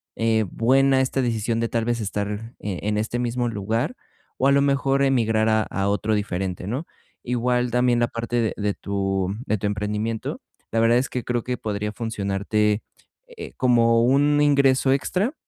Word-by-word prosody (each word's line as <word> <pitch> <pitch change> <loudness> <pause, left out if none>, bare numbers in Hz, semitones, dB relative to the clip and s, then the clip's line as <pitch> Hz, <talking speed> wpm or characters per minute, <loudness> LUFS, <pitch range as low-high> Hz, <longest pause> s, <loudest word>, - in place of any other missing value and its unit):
eh, 110 -1 +1
buena 135 +3 +3
esta 130 +1 0
decisión 115 -2 -1
de 115 0 -1
tal 115 -1 -1
vez 120 -1 -1
estar, 105 +3 -4
eh, 100 -4 -4
en 105 0 0
este 110 +3 -2
mismo 120 0 -1
lugar 110 - -2 0.4
o 135 - +2
a - - +5
lo 140 0 +4
mejor 140 0 +2
emigrar 115 -5 +2
a 110 0 +3
a 100 -1 -2
otro 105 +2 0
diferente, 95 -3 -3
¿no? 130 +10 -3 0.4
Igual 125 0 0
también 125 0 +2
la 120 - +2
parte 115 +1 -3
de 110 - 0
de 105 -1 -1
tu 95 -1 -2
de 110 - 0
tu 105 - -1
emprendimiento, 105 +2 -3 0.3
la 115 - +1
verdad 115 +1 +4
es 130 +2 0
que 125 - -3
creo 120 -1 -1
que 125 0 -2
podría 105 -1 -3
funcionarte, 105 0 -1 0.5
eh, 480 -3 -10
como 115 -2 +4
un 145 +4 +3
ingreso 140 -2 +3
extra, 185 - 0
115 Hz, 180 wpm, -23 LUFS, 105-125 Hz, 0.5 s, a